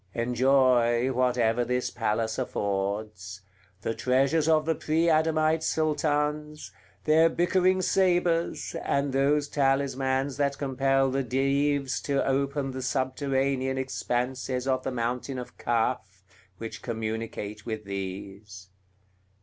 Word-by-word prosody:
Enjoy 125 0 +3
whatever 120 -2 +1
this 125 +1 -1
palace 110 -1 -1
affords: 100 -1 -3 0.4
the 115 - -1
treasures 135 +6 +1
of 155 -1 +3
the 165 - +2
pre 160 +2 0
Adamite 155 0 +2
Sultans, 150 -1 -1 0.3
their 160 +2 +5
bickering 185 +2 +2
sabres, 175 -3 +1
and 140 -1 0
those 145 +2 +2
talismans 135 -1 0
that 140 -1 0
compel 135 -1 +1
the 135 +1 0
Dives 135 +1 0
to 140 -1 0
open 135 0 0
the 130 0 -5
subterranean 130 0 -1
expanses 130 0 -2
of 130 -1 +1
the 135 - -3
mountain 125 +2 -3
of 125 - -8
Kaf, 110 -5 -1 0.3
which 110 -1 -7
communicate 110 -2 -5
with 110 -2 -4
these. 95 0 -7
130 Hz, 110 wpm, -27 LUFS, 115-145 Hz, 0.4 s, their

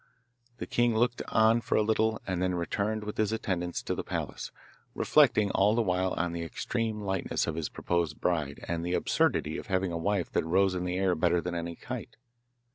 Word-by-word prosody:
The - - -4
king 120 -1 +1
looked 120 +1 +1
on 110 +1 +4
for 115 - -1
a - - +4
little, 110 0 +1
and 90 -2 -2
then 90 -1 +1
returned 105 +5 -1
with 105 0 -6
his 110 -1 +1
attendants 90 -6 -2
to - - -2
the - - -3
palace, - - -4 0.5
reflecting 105 -2 +4
all 105 +3 +3
the 120 - +2
while 90 -1 0
on 90 0 0
the 85 - -3
extreme 110 +6 -3
lightness 95 -2 -1
of 85 - -2
his 80 -1 -3
proposed 85 -3 -1
bride 75 -5 -1
and 85 -1 -2
the 90 +1 0
absurdity - - +1
of - - -10
having 95 -1 0
a 85 - -3
wife 100 0 0
that - - +1
rose 95 +4 +2
in 90 -1 -2
the 90 0 -1
air 95 -1 +2
better 85 +1 +2
than 90 +1 -4
any 85 0 -4
kite. - - -7
95 Hz, 205 wpm, -29 LUFS, 85-110 Hz, 0.5 s, on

